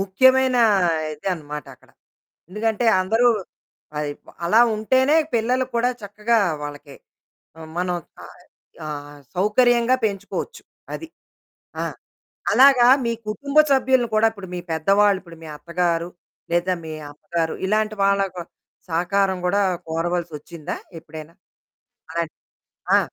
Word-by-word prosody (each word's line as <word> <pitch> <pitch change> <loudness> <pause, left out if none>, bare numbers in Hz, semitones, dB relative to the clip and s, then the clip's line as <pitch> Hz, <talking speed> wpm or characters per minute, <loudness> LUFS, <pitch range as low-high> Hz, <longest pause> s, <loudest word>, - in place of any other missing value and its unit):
ముఖ్యమైన 260 +7 +4 0.6
ఇదనమాట 150 -3 -4
అక్కడ. - - -25 0.6
ఎందుకంటే, 220 +3 -1 0.2
అందరూ 225 +6 +3 0.7
పై 150 0 -2 0.2
ప - - -28 0.2
అలా 215 +7 +5
ఉంటేనే 260 +7 +3 0.2
పిల్లలు 245 +3 +1
కూడా 240 +1 +2
చక్కగా 210 +3 0 0.2
వాళ్ళకి 145 -1 -8 0.6
హ్మ్, 160 -1 -10
మనం 180 0 0 0.3
ఆయ్ - - -16 0.4
ఆహ్, 145 -1 -7 0.2
సౌకర్యంగా 235 +5 +3
పెంచుకోవచ్చు. 200 - -4 0.3
అది. 325 - -6 0.8
ఆ! - - 0 0.7
అలాగా 260 -2 +7 0.2
మీ 235 - +1 0.2
కుటుంబ 280 +7 -3
సభ్యులను 260 -2 +3
కూడా 220 +1 +5
ఇప్పుడు 200 -4 -10
మీ - - -3
పెద్దవాళ్ళు, 195 +5 +3
ఇప్పుడు 170 -3 -14
మీ - - -9
అత్తగారు, 170 0 -1 0.4
లేదా 175 +2 +2
మీ 160 - -6 0.2
అమ్మగారు, 160 +2 -3
ఇలాంటి 215 +1 +1
వాళ్ళకి 195 -3 +1 0.5
సహకారం 190 +3 +1
గూడా 200 +3 +2 0.3
కోరవలసొచ్చిందా 165 -1 -3 0.2
ఎప్పుడైనా? 160 +1 -11 0.8
అలాంటి 165 -1 -3 0.6
ఆ! - - +5
195 Hz, 110 wpm, -22 LUFS, 165-230 Hz, 0.8 s, అలాగా